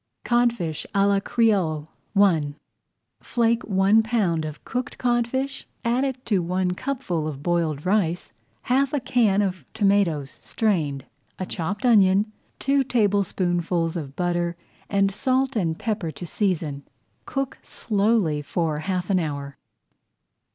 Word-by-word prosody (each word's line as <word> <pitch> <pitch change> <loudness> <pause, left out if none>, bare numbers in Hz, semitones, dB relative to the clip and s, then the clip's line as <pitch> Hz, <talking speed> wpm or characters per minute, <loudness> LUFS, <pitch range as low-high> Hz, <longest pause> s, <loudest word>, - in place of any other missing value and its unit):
CODFISH 235 -10 +1
À 200 0 +4
LA 200 -1 +3
CREOLE 190 -9 +1 0.3
I 165 -8 +3 0.7
Flake 235 -1 +1
one 195 +2 +4
pound 200 -8 0
of 150 -1 -8
cooked 255 +3 -4
codfish, 250 +3 -1 0.2
add 260 +2 +1
to 210 - +2
it - - +2
one 180 +1 0
cupful 185 - -2
of 145 -2 -6
boiled 165 -4 0
rice, 175 - 0 0.3
half 270 +2 +1
a 290 - +2
can 215 -6 +2
of 185 -5 -3
tomatoes 190 -9 +1
strained, 155 - -1 0.3
a 185 - -3
chopped 190 +6 -3
onion, 205 -2 +4 0.3
two 275 0 +2
tablespoonfuls 185 -7 +1
of 140 -5 -5
butter, 175 -1 0 0.3
and 195 0 +2
salt 260 +5 +1
and 165 -7 0
pepper 210 -7 -2
to 175 - -7
season. 165 -6 -1 0.5
Cook 275 -1 -3
slowly 205 -8 +1
for 155 0 -1
half 180 +2 -2
an 185 - +3
hour. 140 -4 -4
195 Hz, 130 wpm, -24 LUFS, 165-230 Hz, 0.7 s, À